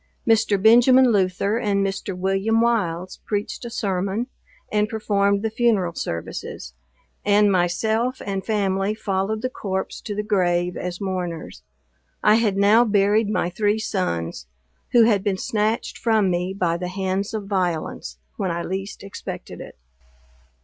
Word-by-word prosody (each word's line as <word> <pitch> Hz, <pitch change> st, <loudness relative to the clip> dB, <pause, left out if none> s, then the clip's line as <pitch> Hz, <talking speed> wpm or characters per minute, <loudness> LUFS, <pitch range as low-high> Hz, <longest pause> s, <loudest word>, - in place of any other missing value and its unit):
Mr. 220 Hz, -3 st, +3 dB
Benjamin 245 Hz, +4 st, +6 dB
Luther, 200 Hz, +2 st, +1 dB
and 200 Hz, -3 st, +1 dB
Mr. 195 Hz, -1 st, -4 dB
William 195 Hz, +4 st, +1 dB
Wiles, 185 Hz, -7 st, 0 dB
preached 205 Hz, +3 st, -3 dB
a -, -, -4 dB
sermon, 195 Hz, +1 st, -1 dB, 0.5 s
and 210 Hz, 0 st, +1 dB
performed 200 Hz, -2 st, +1 dB
the 220 Hz, -, -1 dB
funeral 220 Hz, -7 st, +1 dB
services; 85 Hz, -, -5 dB, 0.5 s
and 205 Hz, 0 st, +4 dB
myself 220 Hz, +8 st, 0 dB
and 195 Hz, -1 st, -3 dB
family 200 Hz, -1 st, 0 dB
followed 210 Hz, +1 st, -2 dB
the 255 Hz, -, 0 dB
corpse 190 Hz, -4 st, -4 dB
to 210 Hz, -, -5 dB
the 210 Hz, -, -2 dB
grave 180 Hz, -4 st, +1 dB
as 180 Hz, -1 st, -5 dB
mourners. 180 Hz, -, -4 dB, 0.6 s
I 210 Hz, -, +6 dB
had 205 Hz, -4 st, +1 dB
now 210 Hz, +4 st, +5 dB
buried 205 Hz, 0 st, +2 dB
my 180 Hz, -4 st, 0 dB
three 205 Hz, +3 st, +1 dB
sons, 85 Hz, -, -3 dB, 0.4 s
who 235 Hz, -, +6 dB
had 210 Hz, -4 st, +3 dB
been 200 Hz, -3 st, 0 dB
snatched 215 Hz, +3 st, -1 dB
from 220 Hz, -5 st, +2 dB
me 180 Hz, +1 st, -1 dB
by 170 Hz, -3 st, 0 dB
the 180 Hz, +1 st, -4 dB
hands 190 Hz, +2 st, -2 dB
of 210 Hz, -2 st, -4 dB
violence, 175 Hz, -, -2 dB, 0.2 s
when 190 Hz, -, -1 dB
I 170 Hz, 0 st, -2 dB
least 195 Hz, +3 st, -5 dB
expected 195 Hz, -, -8 dB
it. -, -, -11 dB
200 Hz, 145 wpm, -23 LUFS, 185-220 Hz, 0.6 s, Benjamin